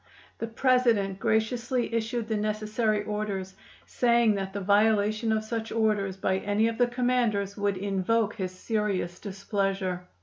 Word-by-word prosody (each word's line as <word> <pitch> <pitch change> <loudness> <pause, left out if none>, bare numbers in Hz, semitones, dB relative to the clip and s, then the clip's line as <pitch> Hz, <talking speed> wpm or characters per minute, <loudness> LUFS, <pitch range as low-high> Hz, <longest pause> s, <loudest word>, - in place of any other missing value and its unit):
The 230 - -3
President 230 -5 +2
graciously 235 +3 0
issued 230 0 -1
the 220 - -1
necessary 215 0 0
orders, 205 -3 -3 0.3
saying 235 -2 +3
that 195 -1 -3
the 200 - -4
violation 210 +2 +2
of 220 0 +1
such 225 0 -4
orders 210 -4 0
by 190 0 0
any 205 +3 +1
of 230 +1 -3
the 245 - +4
commanders 240 -5 0
would 205 -2 -1
invoke 200 +3 0
his 190 -4 -3
serious 185 -3 -2
displeasure. 195 -2 -2
215 Hz, 140 wpm, -27 LUFS, 195-230 Hz, 0.3 s, the